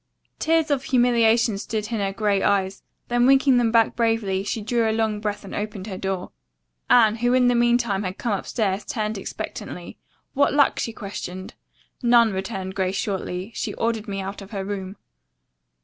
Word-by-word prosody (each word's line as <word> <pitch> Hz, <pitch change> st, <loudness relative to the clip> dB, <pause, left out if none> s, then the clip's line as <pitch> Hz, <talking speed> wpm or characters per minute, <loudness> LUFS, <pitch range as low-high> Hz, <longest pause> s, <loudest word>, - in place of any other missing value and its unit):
Tears 320 Hz, -1 st, +2 dB
of 275 Hz, -1 st, 0 dB
humiliation 235 Hz, -4 st, +3 dB
stood 215 Hz, +1 st, -4 dB
in 225 Hz, -, -1 dB
her 195 Hz, -1 st, 0 dB
gray 200 Hz, -1 st, 0 dB
eyes, 195 Hz, -1 st, +1 dB, 0.3 s
then 240 Hz, +1 st, +3 dB
winking 270 Hz, -1 st, +5 dB
them 235 Hz, -2 st, +2 dB
back 230 Hz, -1 st, +3 dB
bravely, 225 Hz, -5 st, 0 dB
she 215 Hz, -, -3 dB
drew 225 Hz, +1 st, 0 dB
a -, -, +2 dB
long 220 Hz, -1 st, 0 dB
breath 210 Hz, -1 st, -4 dB
and 195 Hz, -, -9 dB
opened 205 Hz, -2 st, -4 dB
her 200 Hz, -3 st, -6 dB
door. 190 Hz, -2 st, -3 dB, 0.6 s
Anne, 225 Hz, -2 st, +5 dB
who 245 Hz, +2 st, +2 dB
in 250 Hz, -1 st, +4 dB
the -, -, +3 dB
meantime 235 Hz, -4 st, +2 dB
had 185 Hz, -1 st, -4 dB
come 235 Hz, -4 st, -1 dB
upstairs, 200 Hz, 0 st, -1 dB
turned 215 Hz, -2 st, -3 dB
expectantly. -, -, -7 dB, 0.3 s
"What 285 Hz, +1 st, +2 dB
luck?" 290 Hz, -1 st, +3 dB
she 230 Hz, -, -2 dB
questioned. 190 Hz, -3 st, -7 dB, 0.5 s
"None," 235 Hz, -3 st, +5 dB
returned 190 Hz, 0 st, -4 dB
Grace 190 Hz, 0 st, -1 dB
shortly. 190 Hz, 0 st, -3 dB
"She -, -, -4 dB
ordered 230 Hz, -1 st, -1 dB
me 195 Hz, -1 st, -3 dB
out 195 Hz, +2 st, -6 dB
of 195 Hz, -, -11 dB
her 195 Hz, -2 st, -4 dB
room." 195 Hz, -1 st, -5 dB
215 Hz, 180 wpm, -23 LUFS, 195-235 Hz, 0.6 s, winking